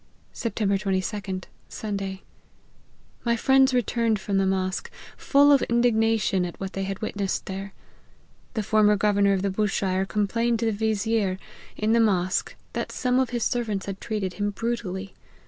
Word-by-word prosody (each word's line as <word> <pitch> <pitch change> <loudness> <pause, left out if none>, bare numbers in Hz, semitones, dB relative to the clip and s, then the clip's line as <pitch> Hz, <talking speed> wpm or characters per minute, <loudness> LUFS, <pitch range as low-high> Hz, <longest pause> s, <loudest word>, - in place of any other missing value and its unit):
" - - -36
Sept. 230 - -4
22d. 195 -1 -1 0.3
Sunday. 195 -2 -4 1.0
My 235 -1 +2
friends 265 +2 +4
returned 230 -3 +1
from 195 0 0
the 195 - +2
mosque, 185 -1 -1 0.3
full 285 +1 +4
of 280 - +6
indignation 225 -5 +2
at 175 -1 -5
what 195 0 -5
they 195 0 -2
had 195 +2 -5
witnessed 200 -2 -2
there. 195 +1 -6 0.8
The 215 - 0
former 210 0 +4
governor 200 -1 +3
of 190 -1 0
Bushire 195 -1 0
complained 230 +3 +1
to 230 - -1
the 225 - +2
vizier, 215 -2 0 0.4
in 215 +1 +1
the 230 - +4
mosque, 185 -5 +1 0.2
that - - -3
some 250 0 +1
of 260 -2 +1
his 240 -2 -2
servants 220 -5 -1
had 195 -1 -6
treated 205 -5 -2
him 205 0 -1
brutally. 205 -3 -3
205 Hz, 155 wpm, -25 LUFS, 195-230 Hz, 1.0 s, of